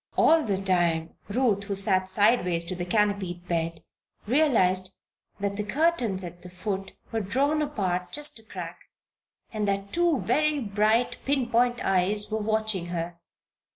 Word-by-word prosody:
All 325 0 +5
the 200 -9 -1
time 175 -4 +1 0.2
Ruth, 205 -3 +1
who 200 -1 -2
sat 190 -1 +1
sideways 190 -4 +3
to 185 - -4
the 175 0 -4
canopied 190 -3 0
bed, 165 -1 -2 0.4
realized 195 -9 +2 0.4
that 200 0 -2
the 210 - -1
curtains 245 - +1
at 175 0 -8
the 180 - -10
foot 195 +2 -4 0.2
were 225 - 0
drawn 275 +10 +1
apart 185 -11 -2
just 295 -5 -1
a - - -17
crack 180 -6 -7 0.7
and 210 -1 -1
that 200 0 -2
two 345 -3 +3
very 300 +9 +2
bright, 215 +1 +1
pin 265 -4 0
point 240 +1 +2
eyes 195 +3 +1
were 220 - 0
watching 215 -4 0
her. 170 0 -4
200 Hz, 155 wpm, -27 LUFS, 180-235 Hz, 0.7 s, All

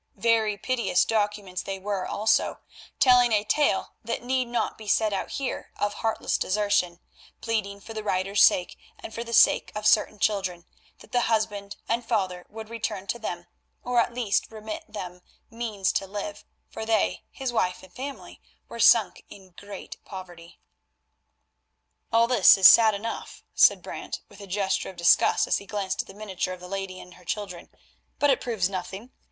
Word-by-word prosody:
Very 225 -3 +2
piteous 235 -6 +1
documents 205 -4 -1
they 195 0 -5
were 195 -1 -3
also, 215 +2 +1 0.4
telling 245 -2 +5
a 210 -1 +3
tale 295 +7 +1
that 235 +1 -3
need 255 +1 0
not 240 0 -1
be 215 - -12
set 215 0 +2
out 195 - -3
here 270 -2 -4
of 205 0 -1
heartless 225 +1 -1
desertion; 200 -3 0 0.4
pleading 205 -3 -2
for 225 +3 -10
the 215 -1 -5
writer's 195 0 +2
sake 180 - +3 0.2
and 220 - -10
for 235 - -4
the 235 - -9
sake 235 - +5
of 210 0 -4
certain 215 -1 +3
children, 190 -4 -1 0.4
that - - -16
the 245 -2 +1
husband 210 -3 -1
and 235 +1 0
father 185 -5 -2
would 220 0 -9
return 220 -4 -4
to 235 - -3
them, 175 -6 -5 0.4
or 245 -1 +1
at 235 - +2
least 235 -4 0
remit 220 +9 -8
them 180 -3 -7 0.3
means 220 -5 -1
to 195 - -2
live, 205 +1 -6 0.2
for - - -7
they, 220 -2 0
his 265 -3 -4
wife 180 -5 0
and 185 -1 -16
family, 275 +2 -8 0.3
were 235 - -9
sunk 220 -5 +5
in 190 -2 -14
great 200 0 -10
poverty. 175 -3 -11 1.5
"All 230 +1 +5
this 235 -5 +6
is 190 - +9
sad 220 -2 +7
enough," 225 +3 -6
said - - +5
Brant - - -6
with - - -14
a 200 - -9
gesture 195 0 -1
of 190 - -11
disgust 170 0 +4
as - - +1
he 200 - -13
glanced 200 -3 -2
at - - -16
the 195 - -12
miniature 190 -3 -4
of - - -18
the 180 - -10
lady 195 -1 -5
and 180 - -12
her 180 - -18
children, 180 -1 -5 0.5
"but 290 -1 +4
it 260 - +1
proves 220 -7 0
nothing. 190 +5 -6
210 Hz, 180 wpm, -26 LUFS, 190-230 Hz, 1.5 s, is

